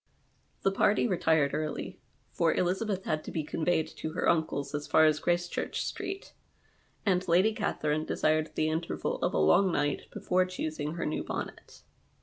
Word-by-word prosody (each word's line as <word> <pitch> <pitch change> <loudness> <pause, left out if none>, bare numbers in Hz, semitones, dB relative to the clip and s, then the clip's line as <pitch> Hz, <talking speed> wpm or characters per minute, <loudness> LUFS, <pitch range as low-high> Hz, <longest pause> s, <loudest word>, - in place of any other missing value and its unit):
The 195 - +3
party 205 +4 +3
retired 160 -7 +2
early, 155 0 -3 0.3
for 165 -1 +2
Elizabeth 190 +2 0
had 155 0 -1
to - - -6
be 160 - -2
conveyed 160 +1 0
to 155 - -4
her - - -1
imclc's 155 -4 +1
as 145 0 -3
far 160 - +5
as 155 -1 +3
Graccchureh 175 0 -1
Street, 385 0 -4 0.7
and 185 -2 +2
Lady 185 +6 +4
Catherine 155 -8 -1
desired 155 0 +1
the 155 - +1
interval 160 +2 -2
of - - 0
a - - +2
long 175 - +4
night 145 -2 -1
before 185 0 +1
choosing 155 -4 -4
her 170 - -3
new 150 - -2
bonnet. - - -7
160 Hz, 160 wpm, -30 LUFS, 155-185 Hz, 0.7 s, far